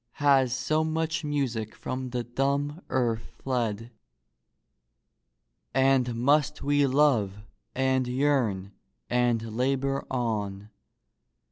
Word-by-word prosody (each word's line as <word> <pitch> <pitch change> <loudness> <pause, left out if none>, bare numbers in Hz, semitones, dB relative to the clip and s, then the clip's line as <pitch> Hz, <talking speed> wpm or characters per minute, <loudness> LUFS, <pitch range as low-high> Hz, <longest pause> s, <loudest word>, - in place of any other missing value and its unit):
Has 135 -3 +3
so 145 +5 +1
much 160 +1 -1
music 130 -7 -2
from 130 0 -4
the 120 -1 -2
dumb 140 - -1
earth 115 -3 -1
fled? 115 -3 -2 1.8
And 130 -2 +3
must 145 +4 +2
we 145 0 +3
love 120 -8 +2 0.3
and 130 -1 +1
yearn 125 -8 0 0.4
and 120 -3 +1
labor 135 +2 0
on? 105 -5 -2
130 Hz, 95 wpm, -27 LUFS, 115-140 Hz, 1.8 s, Has